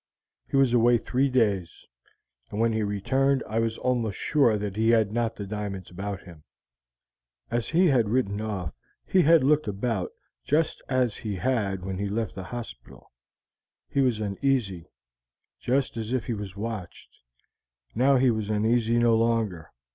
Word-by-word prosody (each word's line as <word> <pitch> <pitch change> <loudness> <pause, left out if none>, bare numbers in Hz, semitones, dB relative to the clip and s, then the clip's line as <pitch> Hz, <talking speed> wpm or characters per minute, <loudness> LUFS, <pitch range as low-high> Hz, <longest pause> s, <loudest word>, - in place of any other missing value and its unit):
"He - - 0
was 135 -3 +4
away 120 0 +5
three 130 +4 0
days, 105 -9 0 0.6
and 105 - -5
when 115 0 +2
he 110 - 0
returned 130 +7 +1
I 110 +2 -1
was 115 0 -1
almost 120 -5 -1
sure 130 -8 +2
that 100 -1 -4
he 110 +1 +2
had 110 -3 +3
not 115 0 -1
the 100 - -6
diamonds 100 -3 -5
about 100 +1 -5
him. 85 -5 -14 1.1
As 120 -1 -1
he 175 +4 +4
had 125 - +3
ridden 105 -4 0
off 100 -7 -4 0.3
he 185 - +3
had 165 -2 +5
looked 150 -1 +3
about 100 -1 -2 0.3
just 155 +2 0
as 125 -4 +1
he 105 -3 -4
had 100 -4 -1
when 95 -1 -4
he 100 - -1
left 110 +1 -2
the 95 -1 -7
hospital: 120 +3 -9 0.8
he 140 - +1
was 125 -5 +1
uneasy, 100 -4 -1 0.7
just 130 0 0
as 110 0 -4
if 130 -3 -1
he 120 - -2
was 100 -3 -6
watched; 105 -3 -7 0.8
now 135 +4 +4
he 130 -1 +4
was 110 -2 -3
uneasy 115 +2 +2
no 120 -1 +4
longer. 110 -9 0
115 Hz, 160 wpm, -26 LUFS, 100-125 Hz, 1.1 s, away